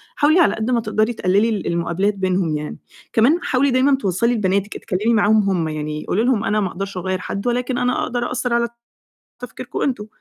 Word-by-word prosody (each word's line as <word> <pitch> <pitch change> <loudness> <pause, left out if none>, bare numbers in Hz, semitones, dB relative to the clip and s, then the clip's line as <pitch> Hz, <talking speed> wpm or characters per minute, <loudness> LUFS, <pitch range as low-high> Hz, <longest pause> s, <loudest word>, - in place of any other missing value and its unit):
حاولي 310 +4 +4
على 340 - +4
قد 220 +3 -2
ما 235 -2 +2
تقدري 220 +2 0
تقلِّلي 205 +2 +2
ال 210 -3 -2
المقابلات 170 +4 0
بينهم 185 -4 0
يعني، 150 0 -6 0.4
كمان 265 +10 +4
حاولي 265 +1 +2
دايمًا 265 +2 +4
توصّلي 220 +1 0
لبناتِك 200 -2 0
أتكلّمي 210 +6 -1
معاهم 210 -2 +3
هم 170 -4 0
يعني، 155 0 -4
قولي 215 - +1
لهم 240 -3 +1
أنا 215 -1 +1
ما 195 - 0
أقدرش 195 +2 -6
أغيّر 185 +1 -2
حد 200 +4 -4
ولكن 245 +1 -1
أنا 250 0 0
أقدر 245 0 -2
أأثّر 250 -1 -2
على 235 0 +2 0.7
تفكيركم 245 +1 -7
أنتم، 230 -6 -1
215 Hz, 195 wpm, -20 LUFS, 185-245 Hz, 0.7 s, حاولي